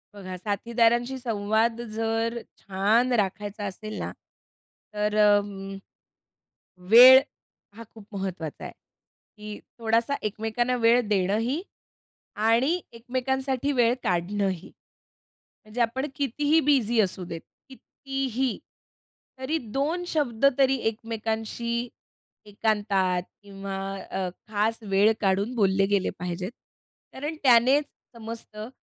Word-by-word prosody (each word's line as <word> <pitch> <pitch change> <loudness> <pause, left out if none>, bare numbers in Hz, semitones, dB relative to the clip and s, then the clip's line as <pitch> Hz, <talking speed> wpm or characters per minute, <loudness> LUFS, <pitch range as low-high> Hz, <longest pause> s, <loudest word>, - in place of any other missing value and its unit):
बघा, 185 -2 -7
साथीदारांशी 235 +5 +1
संवाद 225 0 0
जर 225 +1 -1 0.2
छान 210 +6 +1
राखायचा 205 -1 -1
असेल 215 +2 -6
ना - - -4 0.8
तर 210 0 -1
अं, 205 -2 +2 1.1
वेळ 255 +3 +10 0.6
हा 230 - -8
खूप 220 -3 -13
महत्त्वाचा 185 -5 -5
आहे, - - -7 0.6
की 210 0 -8 0.2
थोडासा 230 +3 +1
एकमेकांना 225 +4 -1
वेळ 235 +1 +4
देणंही 215 - 0 0.7
आणि 235 +11 +2
एकमेकांसाठी 260 +3 -2
वेळ 240 -2 +3
काढणंही. 185 +1 -1 0.9
म्हणजे 215 +3 -6
आपण 240 +4 0
कितीही 290 +3 +2
बिझी 250 -6 +3
असू 190 -2 -1
देत, 165 -1 -6 0.3
कितीही, 265 -2 -3 0.8
तरी 270 +5 -1
दोन 280 +8 -2
शब्द 275 -9 -1
तरी 270 -1 +4
एकमेकांशी 225 +2 -3 0.6
एकांतात 205 -4 0 0.2
किंवा 195 -1 -7 0.3
अ, 190 -1 -2 0.2
खास 215 +1 0
वेळ 205 +1 +3
काढून 200 +4 +1
बोलले 195 -3 +2
गेले 200 -2 +2
पाहिजेत. 180 +2 -4 0.6
कारण 295 +4 -5
त्यानेच 260 +3 +5 0.3
समजतं 225 -1 -8
225 Hz, 100 wpm, -26 LUFS, 205-245 Hz, 1.1 s, वेळ